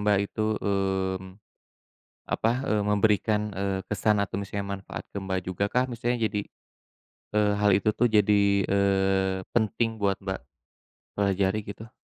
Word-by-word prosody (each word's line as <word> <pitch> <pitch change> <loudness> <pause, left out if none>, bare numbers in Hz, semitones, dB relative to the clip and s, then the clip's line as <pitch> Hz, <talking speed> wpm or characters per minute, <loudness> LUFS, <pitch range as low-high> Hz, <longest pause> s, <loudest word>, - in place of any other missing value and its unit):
Mbak 105 -1 +3
itu, - - -6 0.2
mmm, 95 -1 -1 1.1
apa? 115 - +2 0.2
E - - 0 0.2
memberikan, 105 +1 +2 0.2
eee, 100 -1 -1
kesan 105 +1 +1
atau 95 - -5
misalnya 100 0 -4
manfaat 95 - -7
ke - - -6
Mbak 95 -1 -1
juga 95 +2 -1
kah, 125 +1 +4
misalnya 120 +1 -1
jadi, 105 -1 -1 1.0
eee, 105 -1 +3
hal 105 -1 +4
itu 100 - +1
tuh 120 - +4
jadi, 105 0 +5 0.3
eee, 95 -1 +2 0.2
penting 115 0 +2
buat 100 -1 +2
Mbak 95 0 -3 0.8
pelajari, 100 0 +1
gitu? 110 +3 -12
100 Hz, 140 wpm, -27 LUFS, 95-105 Hz, 1.1 s, jadi